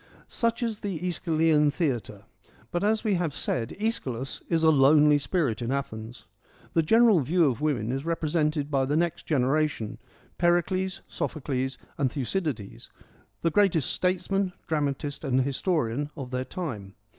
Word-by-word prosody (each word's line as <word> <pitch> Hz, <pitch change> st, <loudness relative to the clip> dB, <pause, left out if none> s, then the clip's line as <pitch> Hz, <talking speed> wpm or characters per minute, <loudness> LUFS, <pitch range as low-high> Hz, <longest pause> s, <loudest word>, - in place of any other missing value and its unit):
Such 230 Hz, +1 st, -1 dB
is 225 Hz, -3 st, -2 dB
the 195 Hz, -6 st, -3 dB
^Eschylean 160 Hz, -3 st, +2 dB
theatre; 140 Hz, -, -2 dB, 0.5 s
but, 175 Hz, -, -1 dB
as 215 Hz, +1 st, +2 dB
we 215 Hz, -3 st, +1 dB
have 155 Hz, -5 st, -2 dB
said, 115 Hz, -2 st, -2 dB
iEschylus 135 Hz, -, -3 dB
is 165 Hz, -1 st, +2 dB
a 160 Hz, -, +6 dB
lonely 150 Hz, +1 st, +5 dB
spirit 140 Hz, -, -1 dB
in 120 Hz, +1 st, -2 dB
Athens. 120 Hz, -4 st, -5 dB, 0.5 s
The 165 Hz, -, +4 dB
general 225 Hz, +3 st, +5 dB
view 165 Hz, +5 st, +2 dB
of 130 Hz, -2 st, 0 dB
women 125 Hz, -7 st, 0 dB
is 135 Hz, +1 st, -2 dB
represented 155 Hz, -2 st, 0 dB
by 135 Hz, -2 st, +2 dB
the 145 Hz, +2 st, +1 dB
next 170 Hz, 0 st, -1 dB
generation, 140 Hz, -4 st, 0 dB, 0.4 s
Pericles, 185 Hz, +2 st, +1 dB
Sophocles, 135 Hz, -3 st, -3 dB, 0.2 s
and 135 Hz, -3 st, +1 dB
Thucydides, 140 Hz, -, -3 dB, 0.5 s
the 165 Hz, -, +2 dB
greatest 170 Hz, -6 st, +2 dB
statesman, 185 Hz, +1 st, 0 dB
dramatist, 145 Hz, -2 st, -2 dB
and 130 Hz, 0 st, +2 dB
historian 140 Hz, -1 st, -1 dB
of 130 Hz, -3 st, -6 dB
their 130 Hz, 0 st, -2 dB
time. 115 Hz, -, -6 dB
150 Hz, 145 wpm, -27 LUFS, 135-175 Hz, 0.5 s, a